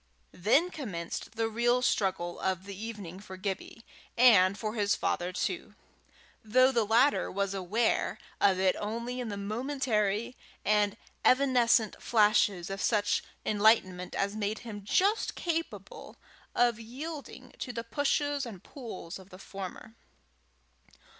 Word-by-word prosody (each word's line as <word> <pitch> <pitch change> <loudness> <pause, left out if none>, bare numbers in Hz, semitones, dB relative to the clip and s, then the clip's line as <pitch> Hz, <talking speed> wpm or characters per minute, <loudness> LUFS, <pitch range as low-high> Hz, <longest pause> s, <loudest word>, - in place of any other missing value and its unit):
Then 275 - +3
commenced 200 - -5
the 225 0 0
real 240 +2 +1
struggle 185 -6 0
of 190 -1 -1
the 200 -1 -7
evening 200 -4 -7
for 190 -2 -10
Gibbie 195 +3 -5 0.3
and 200 -6 +6
for 215 -1 -3
his 205 -2 +1
father 175 +1 -1
too, 185 +2 -3 0.7
though 255 +4 +4
the 235 -4 +2
latter 245 +6 +3
was 200 0 -1
aware 200 +5 0 0.2
of 195 -2 +4
it 190 -1 +3
only 235 +4 -3
in 245 -3 -3
the 200 - -4
momentary 220 0 -1 0.3
and 210 -1 +2 0.3
evanescent 250 -5 +3
flashes 205 -5 +3
of 195 0 -4
such 205 -2 +1 0.2
enlightenment 205 -4 +2
as 200 +1 -1
made 215 0 -1
him 205 -3 -7
just 395 - +1
capable 330 -1 -4 0.4
of 240 -2 +3
yielding 260 +2 -8
to 250 - -4
the 230 -1 -4
pushes 285 +3 0
and 220 -8 -8
pulls 215 - -8
of 190 0 -15
the 185 - -12
former. 195 +3 -8
215 Hz, 135 wpm, -30 LUFS, 195-245 Hz, 0.7 s, and